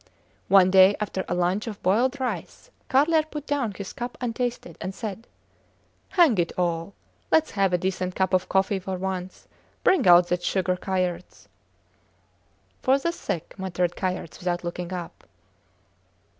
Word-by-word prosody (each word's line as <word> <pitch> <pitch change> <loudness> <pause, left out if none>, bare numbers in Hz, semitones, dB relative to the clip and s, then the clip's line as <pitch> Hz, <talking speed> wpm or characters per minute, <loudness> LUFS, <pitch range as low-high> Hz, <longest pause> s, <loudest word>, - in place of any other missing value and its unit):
One 190 -2 +6
day 190 +1 +7
after 195 -3 -2
a - - -1
lunch 180 +5 0
of 210 -3 -6
boiled 245 +9 +2
rice, 260 - -5 0.2
Carlier 310 +4 +4
put 300 -1 -8
down 280 -7 -1
his 200 -1 -7
cup 240 0 -6
untasted, 240 -7 -3
and 190 +1 -5
said: 220 0 -6 0.8
Hang 320 - +4
it 170 - +1
all! 170 +1 -1 0.3
Lets 320 0 +3
have 195 -2 +1
a 180 - +3
decent 185 0 -2
cup 190 -1 0
of 185 0 +1
coffee 195 +1 +1
for 190 0 -4
once. 185 0 -5 0.4
Bring 370 - +3
out 175 0 +7
that 180 0 0
sugar, 185 0 0
Kayerts! 180 -1 -3 1.3
For 265 +1 +4
the 335 +5 -1
sick, 170 - -5
muttered 180 -2 -1
Kayerts, 185 -3 -4
without 175 -1 -2
looking 175 +1 -5
up. 175 -2 -7
190 Hz, 150 wpm, -25 LUFS, 180-240 Hz, 1.3 s, day